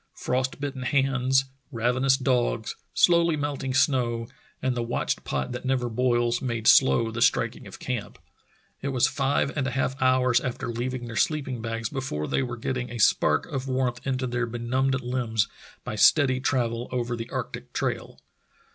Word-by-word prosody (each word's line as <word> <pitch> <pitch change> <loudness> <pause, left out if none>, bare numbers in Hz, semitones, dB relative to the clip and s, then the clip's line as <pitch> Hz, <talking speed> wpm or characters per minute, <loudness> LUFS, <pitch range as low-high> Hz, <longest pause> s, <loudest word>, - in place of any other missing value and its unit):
Frost 130 +2 -1
bitten 140 -2 -4
hands, 135 0 +2 0.3
ravenous 125 +3 +2
dogs, 125 -4 0 0.2
slowly 170 -2 +4
melting 140 -2 -2
snow, 125 -4 +2 0.3
and 130 -1 -1
the 120 - -1
watched 115 +1 -2
pot 65 - -2
that 125 - -5
never 130 -2 0
boils 120 0 +1
made 115 -3 -3
slow 115 -3 +5
the 115 +1 -4
striking - - +1
of - - -10
camp. - - -4 0.6
It - - -3
was 130 -3 +3
five 140 -1 0
and 140 -3 0
a - - 0
half 130 +1 -1
hours 130 -1 +4
after 125 -1 -4
leaving 120 +1 -3
their 115 -1 -7
sleeping 135 -2 0
bags 115 0 -3
before 130 - -3
they - - 0
were 120 -2 -4
getting 125 +2 -3
a 120 - -6
spark 110 - +3
of 135 0 -4
warmth 130 -2 0
into 130 -1 0
their 125 0 -1
benumbed 130 +3 0
limbs 120 -4 0 0.4
by 125 - -5
steady 130 +4 +4
travel 120 -3 0
over 120 -1 -1
the 115 0 -6
arctic - - -5
trail. - - -3
125 Hz, 165 wpm, -26 LUFS, 120-135 Hz, 0.6 s, slow